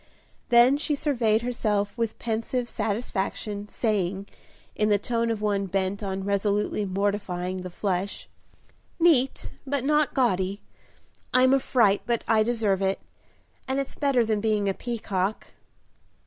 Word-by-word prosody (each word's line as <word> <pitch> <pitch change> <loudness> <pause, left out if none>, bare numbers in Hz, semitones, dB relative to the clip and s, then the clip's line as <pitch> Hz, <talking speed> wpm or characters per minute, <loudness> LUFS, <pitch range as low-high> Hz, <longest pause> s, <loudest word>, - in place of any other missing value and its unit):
Then 245 +3 +6
she 300 -1 0
surveyed 235 -7 +1
herself 210 -4 -1
with 230 -2 -2
pensive 235 +2 -2
satisfaction, 210 -2 -3
saying, 200 -4 -1 0.5
in 210 0 +1
the 205 - +4
tone 230 +2 -1
of 220 -2 -2
one 200 -2 0
bent 195 +2 -1
on 195 -1 -3
resolutely 205 +1 0
mortifying 185 -2 -2
the 180 0 -6
flesh, 190 +1 -2 0.7
"Neat 295 -6 +3 0.2
but 280 -1 -1
not 300 +1 +2
gaudy; 195 -6 +1 0.8
I'm 255 +1 +5
a 275 - +5
fright, 220 -6 +3
but 235 -1 0
I 220 -1 +4
deserve 215 -4 +1
it, 195 0 0 0.7
and 265 +1 0
it's 275 - -3
better 275 -5 +2
than 215 -2 0
being 210 -2 +1
a 195 - +1
peacock." 205 -4 -3
215 Hz, 135 wpm, -26 LUFS, 200-240 Hz, 0.8 s, Then